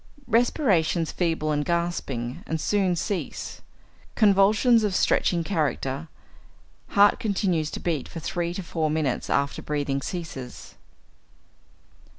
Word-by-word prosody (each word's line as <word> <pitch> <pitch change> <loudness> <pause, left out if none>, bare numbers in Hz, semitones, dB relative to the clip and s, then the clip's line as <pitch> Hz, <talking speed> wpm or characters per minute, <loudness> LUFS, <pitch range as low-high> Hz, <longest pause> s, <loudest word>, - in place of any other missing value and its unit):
Respirations 195 - +2
feeble 165 -3 0
and 145 -1 0
gasping, 150 -8 -2
and 160 - -2
soon 190 +1 +1
cease; 175 +3 -4 0.5
convulsions 215 +3 +4
of 205 -3 0
stretching 170 -2 +2
character; 150 -4 -1 0.8
heart 205 0 +4
continues 190 -9 0
to - - -6
beat 160 -6 -2
for 165 - -7
three 170 +1 -2
to 190 - -4
four 160 -2 -1
minutes 150 -5 -1
after 140 0 0
breathing 145 -2 -2
ceases. 140 -7 -7
170 Hz, 115 wpm, -25 LUFS, 150-195 Hz, 0.8 s, convulsions